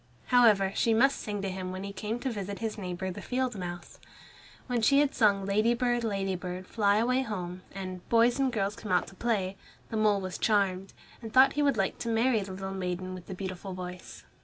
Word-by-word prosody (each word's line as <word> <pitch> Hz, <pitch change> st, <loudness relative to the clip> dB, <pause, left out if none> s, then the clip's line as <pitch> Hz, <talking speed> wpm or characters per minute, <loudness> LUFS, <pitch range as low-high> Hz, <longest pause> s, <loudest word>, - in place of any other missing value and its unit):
However 215 Hz, -6 st, +5 dB
she 225 Hz, -1 st, +3 dB
must 270 Hz, +4 st, +4 dB
sing 205 Hz, -2 st, -4 dB
to 195 Hz, -, -1 dB
him 185 Hz, -1 st, -4 dB
when 185 Hz, +1 st, -5 dB
he 200 Hz, 0 st, -6 dB
came 210 Hz, +4 st, -3 dB
to 265 Hz, -, -1 dB
visit 200 Hz, -2 st, -4 dB
his 225 Hz, -1 st, -3 dB
neighbor 185 Hz, -1 st, -4 dB
the -, -, -7 dB
field 255 Hz, -2 st, -1 dB
mouse. 175 Hz, -2 st, -7 dB, 0.7 s
When 245 Hz, -2 st, -1 dB
she 275 Hz, +5 st, +5 dB
had 290 Hz, -1 st, +2 dB
sung 200 Hz, -3 st, +3 dB
"Ladybird, 235 Hz, +4 st, +2 dB
Ladybird, 190 Hz, -3 st, -3 dB
fly 205 Hz, 0 st, +2 dB
away 250 Hz, +4 st, +2 dB
home," 185 Hz, -7 st, -5 dB
and 185 Hz, -2 st, -7 dB
"Boys 235 Hz, +3 st, +4 dB
and 270 Hz, -1 st, +2 dB
girls 205 Hz, -3 st, -1 dB
come 215 Hz, -, -7 dB
out 180 Hz, -1 st, +3 dB
to -, -, -15 dB
play," 195 Hz, -4 st, -1 dB, 0.3 s
the 225 Hz, -, -1 dB
mole 210 Hz, -2 st, +3 dB
was 185 Hz, -2 st, -5 dB
charmed, 195 Hz, -3 st, +1 dB, 0.3 s
and 225 Hz, -2 st, -7 dB
thought 260 Hz, +3 st, +6 dB
he 295 Hz, -, 0 dB
would 280 Hz, -5 st, +2 dB
like 195 Hz, -1 st, 0 dB
to 235 Hz, -, -3 dB
marry 230 Hz, +1 st, +3 dB
the 195 Hz, -1 st, -6 dB
little 190 Hz, 0 st, -5 dB
maiden 185 Hz, 0 st, -3 dB
with 180 Hz, -1 st, -9 dB
the 190 Hz, -, -6 dB
beautiful 190 Hz, 0 st, -5 dB
voice. 180 Hz, 0 st, -8 dB
200 Hz, 210 wpm, -29 LUFS, 185-230 Hz, 0.7 s, thought